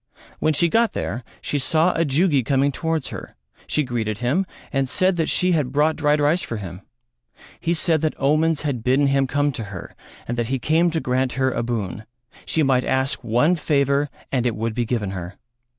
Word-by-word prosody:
When 155 - +2
she 170 +4 +4
got 230 +6 +2
there 120 +5 -3 0.2
she 145 - -1
saw 160 +6 +2
a 165 - +1
Jugi 145 0 +2
coming 135 +3 +2
towards 160 +2 -2
her, - - -8 0.3
she 150 - +1
greeted 115 -5 -2
him 140 - 0 0.3
and 135 -1 0
said 185 +5 +2
that 160 - 0
she 180 0 +2
had 150 -7 +1
brought 150 +3 +2
dried 150 -1 +2
rice 150 +5 +2
for 115 - -4
him. 90 -2 -7 0.8
He 170 +1 0
said 160 -2 +1
that 155 -1 0
omens 155 +3 +2
had 135 -7 -2
bidden 130 +4 +3
him 135 -1 +2
come 145 +2 +1
to 115 -4 -5
her 100 -3 -9 0.3
and 120 0 -2
that 115 - 0
he 135 +2 0
came 160 +7 +2
to 165 -1 -1
grant 130 -2 0
her 130 0 +1
a - - -1
boon: 110 -3 -3 0.4
she 160 - +1
might 130 -2 +3
ask 130 +1 0
one 125 +10 +3
favour 140 -2 +1 0.2
and 125 -2 +1
it 115 - -1
would 115 +1 -2
be 120 +1 -1
given 110 -5 -2
her. 90 -1 -6
140 Hz, 205 wpm, -22 LUFS, 120-155 Hz, 0.8 s, she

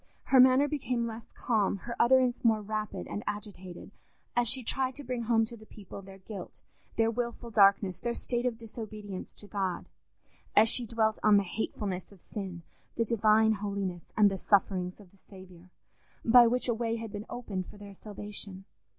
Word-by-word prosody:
Her 265 - +4
manner 260 +3 +7
became 255 -5 -1
less 225 0 -7
calm, 210 -4 +1
her 235 - -4
utterance 255 0 +4
more 220 -2 +3
rapid 215 0 -3
and 205 - -5
agitated, 200 -4 -6 0.4
as 245 0 +3
she 260 +3 +1
tried 260 +2 -1
to 290 - -7
bring 245 -1 -3
home 225 -1 +3
to 235 - -10
the 220 -1 -15
people 200 -1 -10
their 195 0 -12
guilt, 195 0 -9 0.4
their 225 0 +3
wilful 235 0 -4
darkness, 195 -3 +4
their 235 +3 -2
state 240 0 -1
of 235 -2 -2
disobedience 215 -3 -8
to - - -11
God—as 200 +2 -2
she 240 +1 +1
dwelt 220 -1 +1
on 210 -1 +6
the 200 - +3
hatefulness 195 -1 -4
of 200 - -16
sin, 185 -3 -6 0.3
the 230 - +1
Divine 220 0 +4
holiness, 200 -4 -4
and 205 -2 +6
the 195 - -2
sufferings 185 -2 +1
of 195 -4 -16
the 195 - -24
Saviour, 185 -2 -15 0.6
by 240 +1 +8
which 250 +2 0
a 240 - +2
way 230 0 -1
had 225 -2 -6
been 205 +1 -6
opened 200 -7 -4
for - - -13
their 205 -1 -10
salvation. 200 -1 -7
215 Hz, 180 wpm, -30 LUFS, 195-235 Hz, 0.6 s, by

